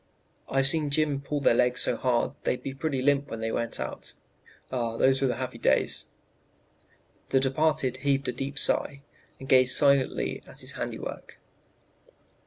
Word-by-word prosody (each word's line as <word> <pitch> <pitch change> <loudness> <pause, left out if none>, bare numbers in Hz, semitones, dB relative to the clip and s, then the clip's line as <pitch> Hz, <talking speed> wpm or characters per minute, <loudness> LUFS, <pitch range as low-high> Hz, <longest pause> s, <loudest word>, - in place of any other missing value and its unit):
"I've 135 0 +2
seen 150 +1 +2
Jim 145 -1 +1
pull 145 +1 -3
their 135 - +4
legs 125 +1 +2
so - - 0
hard 120 -2 0
they'd - - 0 0.2
pretty 145 -1 -1
near 130 - -2
limp 145 0 +2
when 115 - -6
they 115 0 -2
went 115 - -1
out. 65 - -5 0.6
Ah, 115 -3 -2
those 135 +2 +4
were 135 -2 +2
happy 130 -2 -5
days!" - - +1 1.2
The 135 - +3
departed 135 -1 +1
heaved 140 0 0
a - - +1
deep 135 +3 -6
sigh, 140 0 +1 0.4
and 135 - -9
gazed 130 -1 +5
silently 140 -2 +2
at - - -6
his - - -4
handiwork. - - -6
135 Hz, 160 wpm, -27 LUFS, 125-140 Hz, 1.2 s, gazed